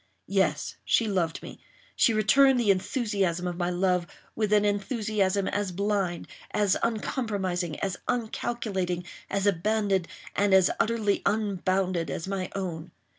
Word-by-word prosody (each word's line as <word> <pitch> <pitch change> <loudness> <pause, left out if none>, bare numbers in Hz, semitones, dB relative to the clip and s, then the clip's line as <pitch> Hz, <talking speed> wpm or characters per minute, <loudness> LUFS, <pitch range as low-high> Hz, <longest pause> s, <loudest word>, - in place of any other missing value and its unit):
Yes, - - +1
she 230 - +2
loved 175 -5 -1
me—she - - -2
returned 250 +5 +5
the 220 -4 +4
enthusiasm 195 -4 0
of 175 -1 -3
my 175 -1 0
love, 180 -1 +1 0.3
with 215 -2 0
an 210 0 +4
enthusiasm 205 -2 0
as 205 -2 -1
blind—as 200 +1 -1
uncompromising—as 195 - -2
uncalculating—as 200 -5 -2
abandoned—and 200 0 +1
as 190 -2 +5
utterly 220 -3 +1
unbounded 185 -5 0
as 165 +6 -4
my 190 -2 -3
own! 175 -3 -4
195 Hz, 110 wpm, -27 LUFS, 180-215 Hz, 0.3 s, returned